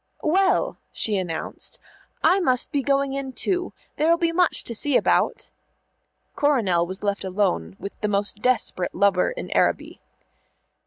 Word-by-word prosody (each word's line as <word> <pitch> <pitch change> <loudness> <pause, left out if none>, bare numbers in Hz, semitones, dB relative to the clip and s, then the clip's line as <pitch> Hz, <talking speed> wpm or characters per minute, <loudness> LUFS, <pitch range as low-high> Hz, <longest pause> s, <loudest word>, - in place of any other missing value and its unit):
"Well," 380 +4 +2
she 215 - +1
announced, 175 -4 -4 0.5
"I 380 - +5
must 255 -9 +1
be 285 - +1
going 275 0 +1
in, 275 -1 -4
too. 360 +9 -1 0.3
There'll 330 +3 +3
be 335 -1 +1
much 355 0 +1
to 235 - -5
see 275 +4 +2
about." - - +1 0.8
Coronel 205 -13 +2
was 190 +3 -7
left 200 -1 -1
alone 185 - -1
with 200 - -6
the 210 - +1
most 205 0 -1
desperate 230 -7 0
lover 195 -1 +3
in - - -6
Araby. - - 0
250 Hz, 145 wpm, -24 LUFS, 200-305 Hz, 0.8 s, I